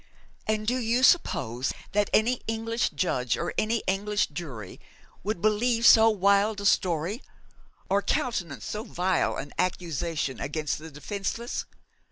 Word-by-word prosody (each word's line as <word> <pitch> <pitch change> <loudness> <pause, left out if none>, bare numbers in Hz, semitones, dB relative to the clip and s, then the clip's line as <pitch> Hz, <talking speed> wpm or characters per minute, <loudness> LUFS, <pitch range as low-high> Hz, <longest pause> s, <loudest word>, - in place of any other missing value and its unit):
'And 215 0 0
do 245 +4 +1
you 240 +2 +1
suppose 135 - +2 0.2
that 205 0 +1
any 235 +3 +2
English 225 +1 -1
judge 125 -4 0
or 175 - -3
English 210 -2 0
jury 135 - -7 0.4
would 205 -3 -3
believe 230 +2 +2
so 225 -1 +8
wild 200 +1 +3
a 200 - -5
story 185 - +1 0.7
or 200 +1 +2
countenance 185 -10 -2
so 210 +1 -4
vile 185 -3 0
an 145 - -6
accusation 165 -5 -2
against 150 +1 -2
the 160 +1 -9
defenceless?' 200 +10 -4
200 Hz, 130 wpm, -27 LUFS, 160-220 Hz, 0.7 s, so